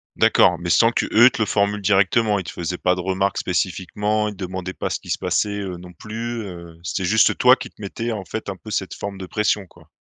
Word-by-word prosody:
D'accord, 90 -2 +4
mais 85 0 -4
sans 115 +6 +5
qu'eux 120 +1 +5
te - - -4
le 110 - +2
formule 100 0 +1
directement. 105 +2 +3
Ils 95 - -3
te - - -7
faisaient 90 +1 -4
pas 90 - +2
de 90 - -3
remarques 95 +1 0
spécifiquement. 105 +4 -1
Ils 105 - -5
te 95 - -5
demandaient 95 0 -5
pas - - -3
ce - - -2
qui - - -14
se - - 0
passait, 105 -1 -1
heu, 95 -3 -5
non 90 +1 -11
plus, 115 +5 -5
heu, 85 -3 -10
c'était 95 +2 -3
juste 110 +3 +4
toi - - +7
qui - - -8
te - - -18
mettais, 115 +1 -4
en 105 -3 -4
fait, 110 +4 -6
un 95 - -4
peu, 95 +4 -12
cette 95 -3 -2
forme 100 -1 -6
de 95 - -6
pression, 105 +1 0
quoi? - - -21
100 Hz, 250 wpm, -22 LUFS, 90-105 Hz, -, toi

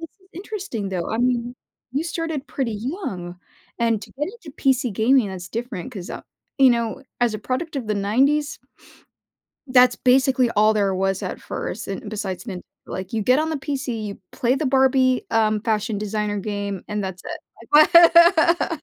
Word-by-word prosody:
this 330 - -7
is 375 - -26
interesting, 365 - -5
though. 180 -3 -3
I 225 - -2
mean, 245 0 0 0.4
you 285 +4 0
started 325 -4 -4
pretty 250 -5 -3
young, 205 - -5 0.4
and 230 -2 +1
to - - -11
get 295 +2 -3
into 410 -10 -12
PC 260 -3 +1
gaming, 225 +2 +3
that's 180 -1 -7
different, 235 -1 -5
'cause, 185 -5 -7
uh, - - -7 0.4
you 265 -2 +7
know, 235 0 -1 0.2
as 235 -3 +2
a - - -3
product 280 +7 -3
of 245 -5 -3
the 210 - 0
'90s 270 +9 +1 1.1
that's 250 -1 +5
basically 255 -1 +3
all 215 0 +3
there 200 -2 +1
was 195 0 -1
at - - -5
first. - - -5
And 210 - -5
besides 205 -2 -4
Nintendo, 185 -6 -6 0.3
like, 185 +2 -6
you 220 - 0
get 250 +6 +4
on 315 +1 0
the 315 - -2
PC, 270 -5 -4
you 200 -1 -6
play 245 +1 +1
the 305 - -1
Barbie, 260 -1 +3
um, 215 -2 +2
Fashion 215 -1 -1
Designer 210 0 -2
game, 200 -2 -4
and 210 -1 -2
that's 190 -1 -6 0.5
it. 335 +1 +6
240 Hz, 175 wpm, -22 LUFS, 210-275 Hz, 1.1 s, you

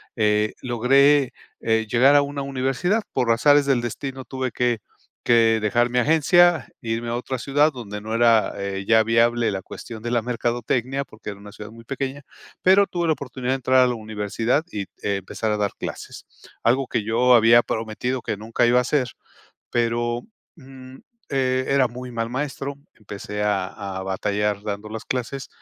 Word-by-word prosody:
eh, 105 -1 +1
logré, 130 +2 +3 0.3
eh, 110 -1 +1
llegar 130 +6 +5
a 145 - +7
una 140 0 -4
universidad, 135 - 0
por 125 -3 +1
azares 145 +5 +4
del 135 -3 +2
destino 130 +2 -5
tuve 130 -1 -3
que 120 0 0 0.5
que 115 -1 +4
dejar 120 +3 +1
mi 125 - -2
agencia, 160 +3 +4
irme 115 +1 -3
a 120 - -1
otra 125 +1 -4
ciudad 145 +4 +2
donde 105 -5 -7
no 110 +2 -6
era, 115 -1 +3
eh, 100 -1 -4
ya 110 -1 +5
viable 115 +1 +2
la 95 -1 -4
cuestión 110 +3 -9
de 120 - -3
la 120 -1 +2
mercadotecnia, 120 +3 -1
porque 110 -4 -9
era 100 - -11
una 105 0 -12
ciudad 105 +1 -10
muy 115 +1 -13
pequeña, 135 +2 -4 0.4
pero 195 +2 +5
tuve 175 -1 -2
la 160 - +4
oportunidad 130 -3 -5
de - - +2
entrar 130 0 +3
a - - +3
la 125 - -1
universidad 110 +5 -1
y 100 -1 -4 0.2
empezar 100 +2 -2
a 105 - 0
dar 100 -2 0
clases, - - -7 0.4
algo 130 +3 +2
que 115 -4 -1
yo 120 +4 +3
había 120 0 +6
prometido 115 +3 -3
que 105 - -3
nunca 115 +3 0
iba 120 +1 +4
a - - +5
hacer, 130 -1 0 0.6
pero, 120 0 0 0.3
mm, 130 -3 -13 0.4
eh, 130 -1 +1
era 135 -1 +3
muy 125 +1 -8
mal 115 -1 -3
maestro, 135 +2 -4 0.2
empecé 105 0 -7
a 100 -3 0 0.3
a - - -4
batallar 100 +2 -1
dando 105 0 -5
las 110 0 -7
clases 130 +1 -4
120 Hz, 180 wpm, -23 LUFS, 110-135 Hz, 0.6 s, a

